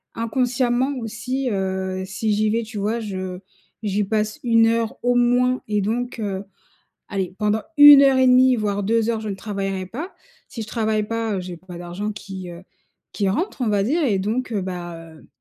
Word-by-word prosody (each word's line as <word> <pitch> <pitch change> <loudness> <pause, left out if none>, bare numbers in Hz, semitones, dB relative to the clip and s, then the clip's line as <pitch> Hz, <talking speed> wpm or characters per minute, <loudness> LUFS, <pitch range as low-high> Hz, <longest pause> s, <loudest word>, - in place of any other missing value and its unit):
inconsciemment 245 +2 0
aussi, 245 +4 -3
heu, 190 -2 -2
si 210 +3 -1
j'y 215 +1 +1
vais, 230 +2 0
tu 220 0 -9
vois? 215 +4 -1
Je 185 -4 -5 0.4
j'y 205 0 0
passe 210 +1 -1
1 230 -2 +4
heure 230 -1 0
au 245 0 +2
moins 245 +1 +2
et 210 -1 +1
donc 240 +4 -2
heu, 200 -3 -3 0.7
allez 190 -2 -3
pendant 210 0 +1 0.2
1 290 -1 +11
heure 270 -1 +5
et 260 - +5
1/2 255 0 +6
voire 205 -2 -1
2 225 +2 +1
heures, 230 -1 0
je 215 - -5
ne - - -3
travaillerai 195 -2 -3
pas, 300 - -7 0.4
si 230 - -8
je - - -7
travaille 220 -1 0
pas, 230 -1 -2
heu, - - -2
j'ai 180 -1 -7
pas 180 0 -11
d'argent 175 +4 -4
qui, 190 -3 -8
heu, 175 +1 -11 0.5
qui 200 -2 0
rentre, 330 - -2
on 235 - +1
va 205 -2 +2
dire 310 +10 +1
et 220 -9 +2
donc, 225 +6 -2
heu, 205 -4 -1
bah, 175 -2 -5 0.2
hem, - - -18
215 Hz, 200 wpm, -22 LUFS, 195-240 Hz, 0.7 s, 1